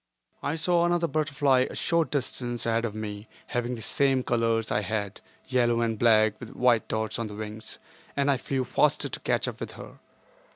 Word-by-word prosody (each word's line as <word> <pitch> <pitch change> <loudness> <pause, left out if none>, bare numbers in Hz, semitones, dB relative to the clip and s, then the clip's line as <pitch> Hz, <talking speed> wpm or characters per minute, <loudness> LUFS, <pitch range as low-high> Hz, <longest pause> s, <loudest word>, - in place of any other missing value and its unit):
I 150 - -1
saw 170 +2 +2
another 175 0 +2
butterfly 145 -4 +2
a - - -8
short 165 -4 +1
distance 120 -3 -2
ahead 115 0 +1
of 105 -2 -4
me 105 0 -6 0.2
having 120 0 -2
the 115 - -7
same 135 -2 +2
colors 115 -2 +1
I 105 - +2
had—yellow 110 +4 -1
and 115 -2 -1
black 110 -2 +4
with 120 - -9
white 120 -3 +3
dots 110 +1 -2
on 115 - -2
the 105 - -8
wings—and 140 +7 -4
I 135 - +2
flew 135 0 -2
faster 125 - +2
to - - -5
catch - - 0
up - - -5
with - - -6
her. - - -11
120 Hz, 180 wpm, -27 LUFS, 110-140 Hz, 0.2 s, black